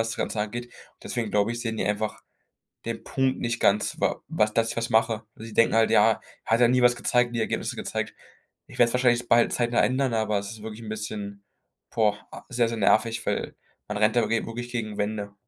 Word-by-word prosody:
was 115 - 0
das - - -5
Ganze 105 - -2
angeht. 120 +3 -4 0.3
Deswegen 115 -4 -3
glaube 105 +2 +2
ich, 120 - -5
sehen 115 -2 -3
die - - -1
einfach 105 +1 -2 0.6
den - - -4
Punkt 130 -1 0
nicht 115 0 -2
ganz, 105 +1 +2
wa - - 0
was 105 0 +1
dass 115 0 +2
ich - - -8
was 115 0 -1
mache. 110 0 +2
Sie 110 0 -10
denken 115 - +4
halt: 115 0 +4
„Ja, 110 +2 +6 0.3
er - - -6
hat 115 - +4
ja 120 - +7
nie 125 +1 +3
was 120 0 +5
gezeigt, 120 0 +1
nie 120 - -2
Ergebnisse 110 - -2
gezeigt.” - - -3 0.5
Ich - - -13
werde 120 - +6
es - - -5
wahrscheinlich 120 -1 +2
bald 120 0 +4
zeitnah 120 -1 +2
ändern, 130 -1 +1
aber 110 -2 +1
es 100 +1 -7
ist 110 -2 -10
wirklich 110 0 -7
'n 110 - -8
bisschen, 105 -2 -6 0.5
boah, 110 -2 +2 0.3
sehr, 120 -2 +1
sehr 115 - -4
nervig, 115 +2 +2
weil - - -2 0.3
man 105 0 -3
rennt 105 +2 +3
da 120 -2 +3
g 115 +1 0
wirklich 120 +1 -6
gegen 110 -4 -4
Wände. 105 -1 -3
115 Hz, 225 wpm, -26 LUFS, 105-120 Hz, 0.6 s, ja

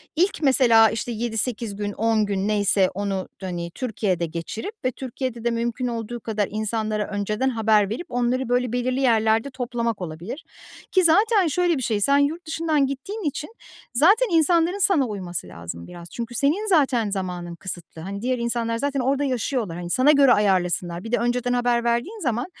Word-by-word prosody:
ilk 365 +5 +1
mesela, 240 -5 +5
işte, 225 +3 -3
7-8 225 -1 -2
gün 205 0 -3
10 220 -1 +1
gün 200 0 -1
neyse 200 -2 +2
onu, 195 -1 -2
hani, 175 -2 -4
Türkiye'de 200 -8 -1
geçirip 170 - -5
ve 255 - +2
Türkiye'de 250 -2 -5
de 235 - +1
mümkün 235 +2 -2
olduğu 235 0 -4
kadar 215 -3 -2
insanlara 215 0 -2
önceden 210 +5 -1
haber 220 -4 +2
verip 245 +11 -4
onları, 245 +1 0
böyle, 245 -1 +1
belirli 250 +1 0
yerlerde 225 0 +3
toplamak 240 -4 -3
olabilir. 175 - -6 0.5
Ki 375 -1 +4
zaten 405 +3 +4
şöyle 345 +1 +1
bir 260 - -3
şey, 215 -3 0
sen 280 +6 +4
yurt 310 +5 0
dışından 315 -3 +1
gittiğin 390 +11 -5
için 300 +2 -3 0.4
zaten 390 - +5
insanların 335 +3 +3
sana 355 -9 +3
uyması 185 -5 -5
lazım 85 0 -8
biraz 170 -1 -11
çünkü 235 0 -5
senin 330 - +1
zaten 265 - +3
zamanın 180 -3 -4
kısıtlı. 175 -3 -8
Hani, 200 +4 -6
diğer 255 +1 0
insanlar 235 -1 -1
zaten 280 +2 -1
orada 275 +3 +1
yaşıyorlar, 245 -8 -1
hani, 175 -1 -6
sana 260 +9 +4
göre 275 -4 +6
ayarlasınlar. 180 -4 +1
Bir 225 - -7
de - - +3
önceden 245 +1 0
haber 245 -1 +1
verdiğin 240 - -1
zaman, 245 - -1
235 Hz, 175 wpm, -23 LUFS, 205-270 Hz, 0.5 s, göre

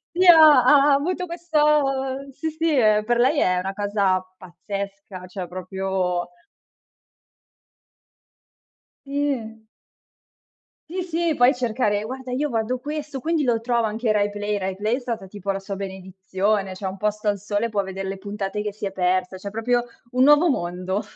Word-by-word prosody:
Sì, 365 0 +3
ha 310 -6 +9
ha 285 +2 +6
avuto 360 +6 0
questo 295 -5 0
sì, 315 +4 -4
sì, 315 -2 0
ehm, 215 -3 +4
per 240 +2 +1
lei 270 +5 +3
è 180 0 +2
una 190 +2 -2
cosa 200 -2 0
pazzesca, 195 +1 -7
cioè 180 -1 -6
proprio 185 0 -2 2.8
Sì. 265 -6 -3 1.3
Sì, 365 +2 -3
sì, 340 -2 0
puoi 245 +2 +4
cercare: 220 -4 0
"Guarda 255 +2 -6
io 290 +3 -1
guardo 230 +2 -1
questo, 290 0 -5
quindi 325 -2 0
lo 230 -2 +1
trovo 235 -1 +1
anche 220 +1 -1
Rai 205 -1 +2
Play?", 205 0 -2
Rai 190 -1 -3
Play 215 +4 0
è - - -5
stata 230 -6 -5
tipo 200 0 -8
la 195 - -3
sua 195 0 -6
benedizione, 190 +1 -2
c'è 190 +1 -8
Un 190 +1 -4
posto 210 +1 -1
al 200 -1 -1
sole 210 +3 -2
può 205 -2 0
vedere 190 0 -5
le 195 - -4
puntate 200 0 -4
che 210 -1 -4
si 210 -1 -6
è 195 - -3
persa, 185 0 0
cioè 200 +2 -7
proprio 240 +3 0 0.3
un 255 +1 +3
nuovo 295 +4 +6
mondo. 185 -2 -2
215 Hz, 160 wpm, -23 LUFS, 195-270 Hz, 2.8 s, ha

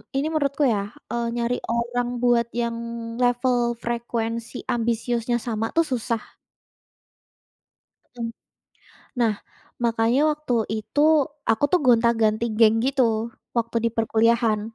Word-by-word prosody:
ini 280 +3 +1
menurutku 290 -1 0
ya, 205 -6 +1 0.2
eee, 235 0 -1
nyari 240 +1 0
orang 240 +1 -1 0.2
buat 235 -1 +3
yang 235 -1 -1 0.5
level 245 -1 +2
frekuensi 235 0 -3
ambisiusnya 235 +1 -1
sama 225 0 -1
tuh 330 - +5
susah. 230 -2 -1 2.0
Mhm. 230 -1 -3 0.9
Nah, 225 -3 +3 0.5
makanya 230 +3 +2
waktu 300 -5 -3 0.3
itu 290 - -3 0.5
aku 225 +5 +2
tuh 360 - +4
gonta-ganti 230 -2 +3
geng 225 -1 +6
gitu 235 -4 +1 0.3
waktu 230 0 -1
di - - +1
perkuliahan. 225 0 +2
235 Hz, 110 wpm, -24 LUFS, 225-245 Hz, 2.0 s, geng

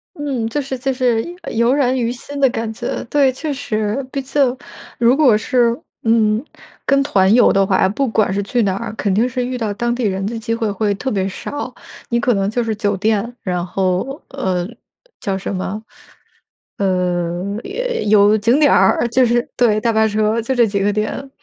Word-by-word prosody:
嗯， 275 -7 -2
就 260 +6 -2
是 265 -1 -5
就 270 +2 -1
是， 250 -3 +1 0.2
呃， - - -6
油 235 +2 +3
然 260 -2 +2
于 235 -2 0
心 280 +3 -7
的 270 -1 +4
感 225 -2 -3
觉， - - -4
对。 275 +1 +3
确 290 +3 -4
实， 215 -1 -2
毕 275 - -2
竟 265 -1 +1 0.4
如 240 +2 +4
果 270 -7 +5
是， 235 +1 +1 0.3
嗯， 225 0 +2 0.4
跟 275 0 +3
团 190 -7 +3
游 245 - +5
的 195 0 +3
话， 190 -1 +2
不 240 +8 -1
管 215 -4 +1
是 200 - 0
去 235 +4 0
哪 195 -2 0
儿， 225 +2 -5
肯 205 -3 -1
定 225 +5 +2
是 250 0 -2
遇 250 0 -3
到 220 -4 -2
当 240 +3 -1
地 245 +1 -3
人 195 -2 -1
的 230 +3 -3
机 230 +1 -3
会 230 -2 -1
会 205 +1 0
特 260 +7 -3
别 195 -2 0
少。 265 +6 -6 0.4
你 235 - +1
可 245 0 +2
能 195 -1 0
就 240 +3 -1
是 225 -1 -2
酒 205 -2 -1
店， 220 +3 0
然 180 -2 -2
后， 190 - -1
呃， 185 -10 -2 0.5
叫 195 -1 -1
什 195 +1 -4
么？ 190 +3 -4 1.0
呃， 180 0 -1
也 - - -3
有 210 0 +5
景 230 +6 +2
点 295 -2 +5
儿， 190 +5 +3
就 255 +2 +3
是 240 0 +1
对， 220 -4 +3
大 230 - +2
巴 220 0 +3
车 215 +1 +1
就 235 +4 -2
这 240 -1 +5
几 200 -2 -1
个 205 +1 +2
点。 215 +6 -3
225 Hz, 220 characters per minute, -18 LUFS, 200-255 Hz, 1.0 s, 果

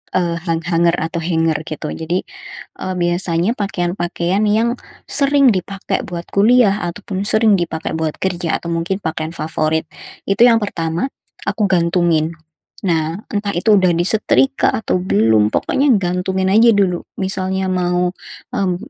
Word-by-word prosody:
Eee, 170 -2 +1
hang 165 0 0
hanger 170 0 +2
atau 165 0 -3
hanger, 165 -2 0
gitu. 155 0 -5
Jadi, 170 +3 -2 0.6
eee, 185 - -3
biasanya 175 +1 0
pakaian-pakaian 175 -1 -1
yang 230 +4 +1 0.3
sering 280 -2 +4
dipakai 195 0 -3
buat 170 -1 -5
kuliah 210 0 +4
ataupun 195 +2 -5
sering 215 -3 +3
dipakai 165 -2 -3
buat 160 -1 -2
kerja 175 -3 -1
atau 170 - -4
mungkin 170 +4 -2
pakaian 160 0 -3
favorit, 155 0 -1 0.4
itu 195 - 0
yang 230 -2 +5
pertama 170 +5 -2 0.4
aku 205 +1 +1
gantungin. 170 -3 +2 0.5
Nah, 165 -2 0 0.2
entah 205 -1 -2
itu 210 +5 +3
udah 185 -1 +3
disetrika 220 +9 +2
atau 215 -4 -1
belum, 110 - +3
pokoknya 280 +1 +1
gantungin 185 +1 -1
aja 225 +4 +5
dulu. 185 -3 +1 0.2
Misalnya, 190 0 -2
mau, 180 -1 0 0.4
mmm, 185 -2 0
180 Hz, 135 wpm, -18 LUFS, 170-200 Hz, 0.6 s, yang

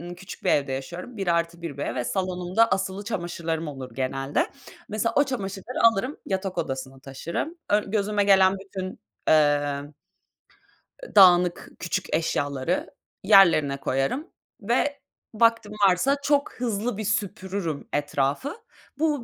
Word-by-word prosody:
ımm, 175 +1 -7
küçük 185 +2 -11
bir - - +3
evde 140 -2 +1
yaşıyorum, 175 - -6
bir 195 -2 -3
artı 170 0 0
bir 160 -5 -5
ve 125 -3 -2
salonumda 185 - +1
asılı 190 +1 -1
çamaşırlarım 170 -6 -3
olur 135 -3 -7
genelde. 135 +2 -1 0.4
Mesela, 220 +2 -1
o 285 - +5
çamaşırları 200 -3 -5
alırım, 255 +8 -3
yatak 190 -1 -2
odasına 135 0 -4
taşırım. 160 - -5
Ön 205 -1 +1
gözüme 205 -1 +1
gelen 190 -1 +5
bütün, 190 -1 -6 0.4
eee, 145 -2 +3 1.2
eee, - - -11
dağınık 180 -2 +6
küçük 180 +2 -3
eşyaları 145 0 -1 0.3
yerlerine 170 -9 +6
koyarım 135 - -1 0.3
ve 260 +6 0 0.3
vaktim 230 -1 +2 0.2
varsa 260 +11 +2
çok 285 -1 +1
hızlı 230 -2 -2
bir 215 - -3
süpürürüm 190 -6 -2
etrafı. 145 - -1 0.4
Bu 300 -5 +1
185 Hz, 130 wpm, -25 LUFS, 150-210 Hz, 1.2 s, dağınık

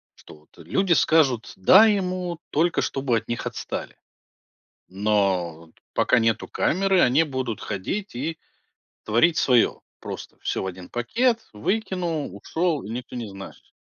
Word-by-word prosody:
Что - - -15
вот, 75 +1 -24
э, - - -11
люди 180 - +1
скажут 135 -9 +2
"да" 190 - +7
ему, 185 -5 -1
только 165 +3 +2
чтобы 135 -3 -1
от 115 - -5
них 120 - -3
отстали. - - -5 0.9
Но 95 -4 +1
вот - - -23 0.2
пока - - +3
нету 115 0 0
камеры, 190 +1 +1
они 135 +6 +4
будут 130 -6 -4
ходить 190 - -4
и 155 +6 -3 0.7
творить 120 +10 +3
свое: 125 -4 +3 0.2
просто - - -8
всё - - -2
в - - -3
1 90 -1 -8
пакет, 230 - 0
выкинул, 170 - -2
ушёл, 160 - -1
и 105 - -8
никто 125 +2 -6
не 115 -3 -4
знаешь. 95 0 -11
130 Hz, 145 wpm, -24 LUFS, 105-175 Hz, 0.9 s, да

